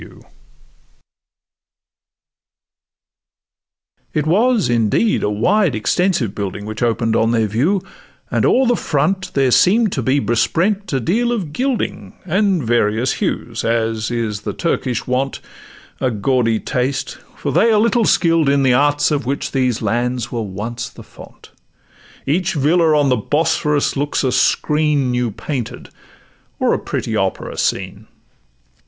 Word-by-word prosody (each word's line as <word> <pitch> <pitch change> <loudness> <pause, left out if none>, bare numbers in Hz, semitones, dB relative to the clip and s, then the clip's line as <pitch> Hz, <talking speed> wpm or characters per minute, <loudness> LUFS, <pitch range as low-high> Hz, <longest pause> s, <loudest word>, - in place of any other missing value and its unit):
It 150 -1 0
was 220 +6 +2
indeed 120 - +1
a - - 0
wide 160 - +1
extensive 130 - 0
building 100 0 -5
Which 110 +2 -6
open'd 115 -1 +1
on 115 - +2
their 115 -1 +2
view, 145 - 0 0.5
and - - +1
o'er 265 - +3
the 245 0 +3
front 180 +3 -1
There 135 -2 +2
seem'd 210 - +4
to 135 - -2
be 130 +4 +1
besprent 170 - 0
a 135 - 0
deal 230 - 0
of 185 -11 -3
gilding 260 - -2
And 190 -2 +1
various 115 +1 +1
hues, - - -2
as 115 -1 -1
is 115 -3 -3
the - - -4
Turkish 130 -8 -2
wont,— 130 +2 -1 0.6
A 130 - +1
gaudy 115 0 +1
taste; 130 +2 -2 0.2
for - - -3
they 230 - +3
are 215 - +4
little 230 +1 +2
skill'd 165 -7 +3
in 140 0 +2
The 130 -2 +4
arts 145 +3 +2
of 145 -4 -1
which 140 +1 -2
these 130 -4 0
lands 120 +1 -1
were 120 -3 -2
once 110 +4 -5
the - - -13
font: - - -15 0.7
Each 170 +7 0
villa 155 +2 +3
on 145 -2 +2
the 125 - +2
Bosphorus 150 +3 0
looks 145 +1 -1
a 130 - +1
screen 150 -2 +1
New 125 -1 0
painted, 125 +3 -6 0.7
or - - +2
a - - 0
pretty - - -3
opera - - -2
scene. 95 +3 -2
135 Hz, 140 wpm, -18 LUFS, 115-170 Hz, 0.7 s, seem'd